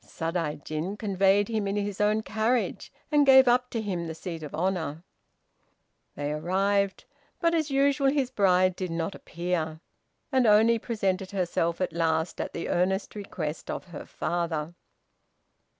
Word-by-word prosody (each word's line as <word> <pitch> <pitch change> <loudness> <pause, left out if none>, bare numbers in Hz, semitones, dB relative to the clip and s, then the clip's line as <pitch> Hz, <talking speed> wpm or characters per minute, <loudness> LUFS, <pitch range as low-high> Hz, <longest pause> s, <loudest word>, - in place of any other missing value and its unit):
Sadaijin 165 +2 -3
conveyed 200 -1 +2
him 220 -3 -1
in 195 - -1
his 205 -1 -2
own 210 +1 +2
carriage, 225 +3 -1 0.2
and 295 -1 +5
gave 265 -1 +7
up 250 +1 +3
to 230 - -3
him 185 -6 -3
the 160 - -5
seat 165 -1 -6
of 150 -1 -7
honor. 165 -3 -2 1.1
They 145 0 -3
arrived; 195 +5 0 0.3
but, 335 -1 +2
as 320 -2 +1
usual, 275 0 +3
his 270 -3 0
bride 185 -5 +3
did 185 -1 -4
not 165 +3 -2
appear, 170 -2 -3 0.5
and 260 -3 +3
only 220 +2 +5
presented 195 -5 -1
herself 175 -3 -1
at 185 - -1
last 160 0 0
at - - -4
the 170 - -4
earnest 190 +3 0
request 165 -7 -5
of - - -3
her 165 - -8
father. 170 -2 -2
190 Hz, 150 wpm, -27 LUFS, 165-220 Hz, 1.1 s, gave